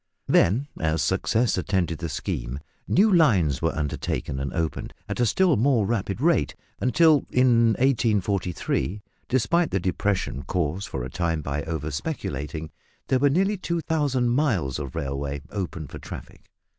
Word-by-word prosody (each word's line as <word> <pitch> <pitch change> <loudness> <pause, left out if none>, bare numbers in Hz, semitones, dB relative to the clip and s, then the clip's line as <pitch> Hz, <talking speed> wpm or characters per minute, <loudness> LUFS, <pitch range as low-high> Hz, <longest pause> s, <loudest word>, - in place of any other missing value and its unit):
Then, 120 +11 +3
as 80 -1 +1
success 115 -4 +1
attended 90 -4 -1
the 85 -2 -3
scheme, - - -3 0.3
new 205 +3 +4
lines 95 - +4
were 80 -1 0
undertaken 65 -3 -2
and 70 -1 -3
opened 80 -1 -3
at - - -4
a 120 - +3
still 185 - +3
more 120 -2 +3
rapid 100 -2 -1
rate 155 - +2 0.2
until, 155 +2 +4
in 120 -3 +4
1843 100 - 0 0.3
despite 140 +7 +2
the 95 - 0
depression 90 -5 -1
caused 90 +5 -2
for 65 -9 -4
a 65 - -5
time 85 -3 -1
by 70 +1 -2
over 80 -1 -3
speculating 75 - -4 0.4
there 130 - +3
were 140 +2 +4
nearly 195 +8 +2
2000 155 -7 0
miles 115 - +1
of 70 -3 -6
railway 70 +1 -3
open 90 -6 -4
for 65 - -9
traffic. - - -10
95 Hz, 145 wpm, -25 LUFS, 75-130 Hz, 0.4 s, new